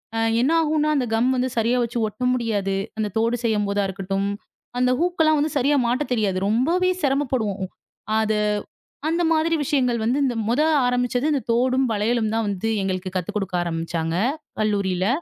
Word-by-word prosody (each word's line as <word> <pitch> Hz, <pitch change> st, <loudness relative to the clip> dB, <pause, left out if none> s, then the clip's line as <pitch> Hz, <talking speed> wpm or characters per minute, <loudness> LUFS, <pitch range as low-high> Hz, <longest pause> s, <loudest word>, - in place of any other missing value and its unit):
அ -, -, -1 dB, 0.2 s
என்ன 265 Hz, +5 st, +2 dB
ஆகும் 315 Hz, -1 st, +1 dB
என்றால்? 305 Hz, 0 st, +2 dB
அந்தக் 245 Hz, -4 st, -1 dB
கம் 240 Hz, +3 st, +2 dB
வந்து 255 Hz, +1 st, 0 dB
சரியாக 235 Hz, +2 st, +2 dB
வைச்சு 235 Hz, +1 st, -4 dB
ஒட்ட 215 Hz, +3 st, -11 dB
முடியாது. 210 Hz, -6 st, -1 dB, 0.2 s
அந்தத் 210 Hz, -2 st, -3 dB
தோடு 230 Hz, +2 st, +1 dB
செய்யும்போது 205 Hz, -2 st, +1 dB
இருக்கட்டும். 195 Hz, +1 st, -2 dB, 0.5 s
அந்த 250 Hz, 0 st, +3 dB
ஹூக்லாம் 325 Hz, -3 st, +2 dB
வந்து 300 Hz, +1 st, 0 dB
சரியாக 280 Hz, +2 st, +3 dB
மாட்ட 255 Hz, +5 st, +1 dB
தெரியாது. 205 Hz, -5 st, 0 dB
ரொம்பவே 335 Hz, +11 st, +2 dB
சிரமப்படுவோம். 245 Hz, -9 st, 0 dB, 0.5 s
அத 220 Hz, 0 st, +1 dB, 0.8 s
அந்த 335 Hz, +2 st, +1 dB
மாதிரி 325 Hz, +1 st, +2 dB
விஷயங்கள் 250 Hz, -4 st, +1 dB
வந்து 250 Hz, +5 st, +1 dB, 0.3 s
முதலில் 300 Hz, +4 st, +3 dB
ஆரம்பித்தது 245 Hz, +1 st, 0 dB
இந்தத் 270 Hz, -4 st, -2 dB
தோடும் 255 Hz, +2 st, +2 dB
வளையலும் 220 Hz, +1 st, 0 dB
தான் 225 Hz, 0 st, 0 dB
வந்து 205 Hz, +2 st, -2 dB
எங்களுக்குக் 185 Hz, -1 st, -3 dB
கத்துக் 180 Hz, +2 st, -4 dB
கொடுக்க 190 Hz, -3 st, -3 dB
ஆரம்பிச்சாங்க, 165 Hz, -1 st, -2 dB, 0.4 s
கல்லூரியில். 200 Hz, -3 st, 0 dB
235 Hz, 160 wpm, -23 LUFS, 200-270 Hz, 0.8 s, அந்த